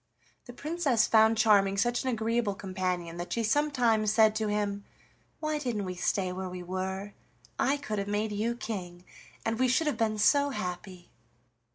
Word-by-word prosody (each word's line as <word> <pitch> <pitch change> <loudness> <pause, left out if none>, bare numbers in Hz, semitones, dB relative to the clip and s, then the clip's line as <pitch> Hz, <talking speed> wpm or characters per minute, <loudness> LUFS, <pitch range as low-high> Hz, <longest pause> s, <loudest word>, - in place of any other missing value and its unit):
The 245 - -10
Princess 285 -5 +1
found 220 0 +4
Charming 200 -3 +4
such 240 +4 +1
an 260 - -2
agreeable 230 -2 0
companion 185 -3 -3
that 175 +1 -6
she 230 - 0
sometimes 235 -4 +2
said 220 -1 +4
to 215 -1 -1
him: 205 -1 -1 0.6
"Why 310 -1 -1
didn't 235 -8 -2
we 185 - -4
stay 185 +1 -1
where 185 0 -5
we 180 0 -7
were? 190 +2 -4 0.5
I 280 +2 +2
could 215 -8 -4
have 200 - -3
made 210 +1 -1
you 220 +3 -1
king, 180 -6 -6 0.4
and 225 +1 -1
we 255 - +3
should 255 +6 +2
have 295 -6 0
been 215 -1 0
so 285 +7 +4
happy!" 180 -5 -6
215 Hz, 175 wpm, -29 LUFS, 190-240 Hz, 0.6 s, found